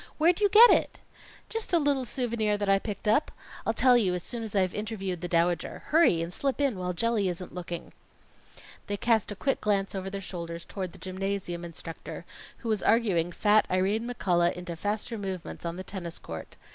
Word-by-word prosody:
Where'd 335 +3 +4
you 410 - +5
get 455 +4 +9
it?" - - +2 0.5
"Just 450 -4 -4
a - - +7
little 285 -4 +1
souvenir 220 -3 0
that 205 0 -2
I 195 0 +5
picked 210 0 -6
up. 220 +8 +3 0.4
I'll - - +2
tell 255 -1 +5
you 195 -7 +3
as 180 - -4
soon 235 - -4
as 220 -2 -5
I've 185 -2 +2
interviewed 195 -5 -3
the 175 - -3
Dowager. 170 0 0
Hurry, 300 - +4
and 170 +2 -6
slip 275 +5 -1
in 270 -9 +1
while 180 0 -1
Jelly 210 +1 +1
isn't 180 +1 -5
looking." 175 -1 -6 0.9
They 205 - -2
cast 220 0 +2
a - - -4
quick 270 +7 -1
glance 200 -2 +1
over 190 -1 -4
their 200 0 -4
shoulders 170 -3 -6
toward 185 -4 -5
the - - -12
gymnasium 190 -2 -3
instructor, 165 -1 -8 0.3
who 230 - -6
was 215 -2 +1
arguing 195 -7 +2
fat 210 +4 +3
Irene 200 +6 +1
McCullough 175 -7 +2
into 180 -1 -6
faster 210 +5 -3
movements 190 -4 -5
on 170 - -4
the 185 - -6
tennis 175 -3 -6
court. 80 - -8
195 Hz, 195 wpm, -28 LUFS, 180-230 Hz, 0.9 s, get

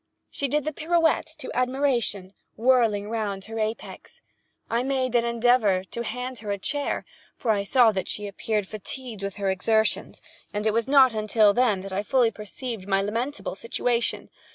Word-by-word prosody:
She 280 - -1
did 295 +2 0
the 310 - -2
pirouette 330 +2 +2
to - - -6
admiration—whirling 235 -3 +1
round 210 -3 -3
upon 225 +2 -8
her 225 - -1
apex. 220 +1 -7 0.4
I 230 +1 0
made 260 -1 -1
an 235 -1 +3
endeavor 235 -5 +3
to 235 +5 -6
hand 250 0 -5
her 210 -1 -7
a 200 - 0
chair, 285 +8 -2 0.3
for 230 - +1
I 200 -2 +1
saw 235 +2 +5
that 190 -2 -3
she 210 - -3
appeared 205 0 -2
fatigued 215 +2 -7
with 200 -1 -4
her 195 -1 0
exertions—and 210 +1 -1
it 215 - +2
was 230 +1 +1
not 270 -3 +6
until 215 -1 +3
then 215 -5 +2
that 195 0 -7
I 195 - 0
fully 240 +1 +2
perceived 210 0 -6
my 195 0 +2
lamentable 235 +8 -3
situation. 235 +3 -1
225 Hz, 170 wpm, -25 LUFS, 205-255 Hz, 0.4 s, not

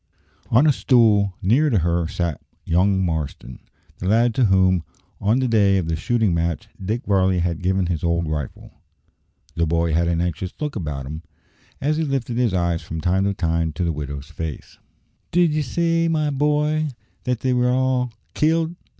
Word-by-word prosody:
On 125 +6 +5
a 150 - +5
stool 105 -8 +3
near 130 +11 +3
to 115 - +2
her 85 -1 +1
sat 85 -3 -3 0.2
young 95 +2 +2
Marston, 75 -6 -4 0.4
the 90 - -3
lad 115 +3 +3
to 125 +1 +3
whom, 95 -3 +3 0.4
on 105 +4 +2
the 130 -1 +1
day 100 -4 +3
of 90 -4 -1
the 80 - 0
shooting 110 +3 +1
match, 85 -1 -1 0.2
Dick 110 +6 -2
Varley 95 -2 +2
had 85 -1 -1
given 95 +1 +1
his 85 -3 -2
old 85 -1 0
rifle. 75 -4 -5 0.8
The 85 0 0
boy 85 0 +1
had 85 +2 +2
an 85 -1 0
anxious 90 +1 -2
look 150 -2 -3
about 75 -9 -4
him, 75 +4 -6 0.6
as 150 +3 0
he 160 - 0
lifted 135 -5 -2
his 120 -4 +2
eyes 85 -2 0
from 80 -1 -6
time 90 +4 +1
to 100 0 0
time 80 -2 0
to 90 - -2
the 85 - +1
widow's 70 -1 -5
face. 80 -2 -7 0.5
"Did 175 -3 +3
ye 155 - +1
say, 165 +4 +1
my 155 -2 +1
boy, 150 +2 +1 0.4
that 125 -2 -1
they 130 -1 +1
were 125 0 +2
all 125 -1 +1 0.2
killed?" 160 +2 +1
95 Hz, 185 wpm, -22 LUFS, 85-125 Hz, 0.8 s, On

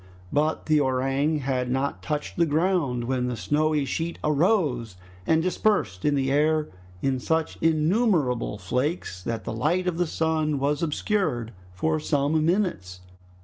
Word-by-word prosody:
But 155 +2 +1
the 155 -1 +3
orang 135 +3 +1
had 130 -2 -1
not 135 +2 -1
touched 150 -1 -3
the 170 -1 +3
ground, 155 -6 +1
when 125 0 -1
the 125 -2 -3
snowy 150 +1 +1
sheet 165 +4 -3
arose 150 - +1 0.3
and 160 0 +3
dispersed 185 - 0
in 145 -1 +3
the 135 -1 0
air 155 +2 +2 0.3
in 135 -1 +1
such 160 +4 -1
innumerable 160 - +1
flakes 125 - -2
that 115 +3 -4
the - - -4
light 165 +11 0
of 175 -2 -1
the 175 - +2
sun 155 -2 0
was 145 +2 0
obscured 150 - -1 0.2
for 155 - 0
some 150 +1 +1
minutes. 165 - -1
150 Hz, 145 wpm, -25 LUFS, 130-160 Hz, 0.3 s, the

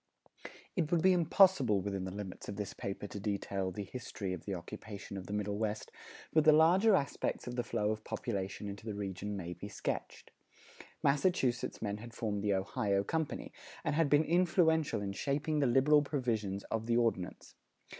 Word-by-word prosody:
It 160 -5 0
would 170 -2 +3
be 190 0 +6
impossible 170 - +5
within 95 -1 -3
the 95 - -4
limits 100 -2 -7
of 100 - -4
this 105 0 -4
paper 100 +1 -5
to 100 - -6
detail 100 -1 -2
the 95 +3 -5
history 100 -3 -5
of 90 - -7
the 100 - -2
occupation 100 +3 -8
of 95 -1 -6
the 100 - -5
Middle 105 0 -1
West; 110 -1 -2 0.4
but 155 - +5
the 155 - +8
larger 180 +7 +6
aspects 140 - -1
of 125 - -5
the 125 - +1
flow 105 -2 0
of 110 0 -4
population 100 -3 -3
into 100 +1 -7
the 105 - -3
region 100 0 -4
may 90 -2 -5
be 90 +4 -8
sketched. 105 - -4 0.7
Massachusetts 140 -6 +1
men 100 -1 -2
had 115 +2 -10
formed 105 -3 -2
the 100 -1 +2
Ohio 100 +1 0
Company, 160 +6 -3 0.3
and 155 -3 0
had 160 -1 +2
been 145 +2 +5
influential 160 - +2
in 100 - -2
shaping 145 +8 -1
the 140 - +3
liberal 135 +5 +5
provisions 115 -9 -1
of 115 0 -1
the 115 0 +3
Ordinance. 115 -7 -1
110 Hz, 185 wpm, -33 LUFS, 100-150 Hz, 0.7 s, the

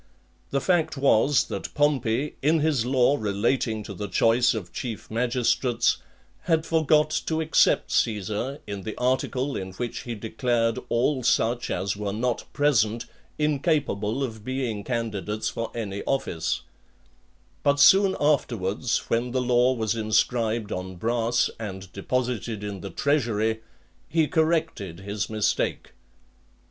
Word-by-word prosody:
The 140 - 0
fact 160 -2 +1
was, 135 0 +4
that - - -4
Pompey, 140 -2 +1
in 155 +3 +3
his 145 -6 +1
law 130 +2 +3
relating 110 +2 0
to 100 - -7
the 105 +2 -5
choice 115 +5 +3
of 90 -6 -6
chief 115 -4 -6
magistrates, 120 +1 +1 0.5
had 160 -2 +2
forgot 155 -1 +3 0.2
to 160 -1 0
except 160 0 +3
Caesar, 110 +5 0
in 100 -2 -5
the 110 +2 -6
article 130 +2 0
in 95 0 -5
which 120 +4 -4
he 120 -1 -5
declared 115 +1 0
all 130 +3 +1
such 120 0 +1
as 95 0 -1
were 100 -1 -3
not 120 +2 -1
present 120 -6 +2 0.3
incapable 140 - 0
of 110 -5 -5
being 125 -4 -3
candidates 110 -3 -2
for 115 0 -4
any 100 -4 -4
office; 90 -12 -1 1.0
but 145 0 +2
soon 195 +5 +6
afterwards, 120 -7 0
when 120 +2 0
the 130 - +1
law 125 0 +3
was 110 -4 0
inscribed 110 0 0
on 95 0 -4
brass, 115 +5 +1
and 95 -3 -7
deposited 120 0 -2
in 100 -2 -5
the 100 - -6
treasury, 110 - 0 0.5
he 160 -2 +2
corrected 155 - 0
his 100 +1 -3
mistake. 110 -1 -1
120 Hz, 135 wpm, -25 LUFS, 105-135 Hz, 1.0 s, soon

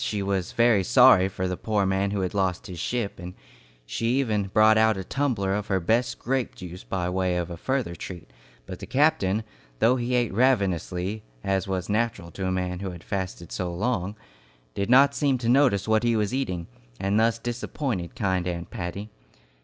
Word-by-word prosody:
She 105 -2 -2
was 95 -2 -2
very 115 -4 +4
sorry 125 -4 +6
for 95 -1 -3
the 90 - -2
poor 105 0 0
man 95 +1 +1
who 100 -1 -2
had 90 -1 -2
lost 95 -3 0
his 90 -4 -8
ship, 115 0 -2
and 90 +1 -8 0.5
she 115 - -2
even 105 -7 0
brought 110 +2 +5
out 110 -1 +4
a 95 - -4
tumbler 110 -6 -1
of 105 +1 -2
her 95 -2 +1
best 115 +8 +1
grape 130 -1 -2
jelly 90 -1 -8
by 90 -2 -1
way 90 0 0
of 90 0 -3
a - - -4
further 130 0 -2
treat; 85 -5 -9 0.3
but - - -8
the - - -8
captain, 110 -8 +2 0.3
though 125 - +3
he 125 +1 -1
ate 120 -5 +1
ravenously, 100 -4 +1 0.2
as 95 -1 0
was 95 -2 -2
natural 105 -5 -1
to 95 +1 -4
a - - 0
man 90 -1 -2
who 95 0 -4
had 85 -2 -9
fasted 95 -4 -4
so 90 -2 -3
long, 100 +1 -2 0.6
did 100 - -2
not 140 +3 +6
seem 140 -3 +1
to 120 -2 -4
notice 120 -6 +3
what 110 0 +3
he 120 -1 +2
was 105 +1 0
eating, 90 -11 -2 0.3
and 100 +2 +1
thus 115 0 +3
disappointed 120 - -4
kind 95 -6 0
Aunt 85 -1 -4
Patty. 100 0 -5
100 Hz, 195 wpm, -25 LUFS, 90-120 Hz, 0.6 s, sorry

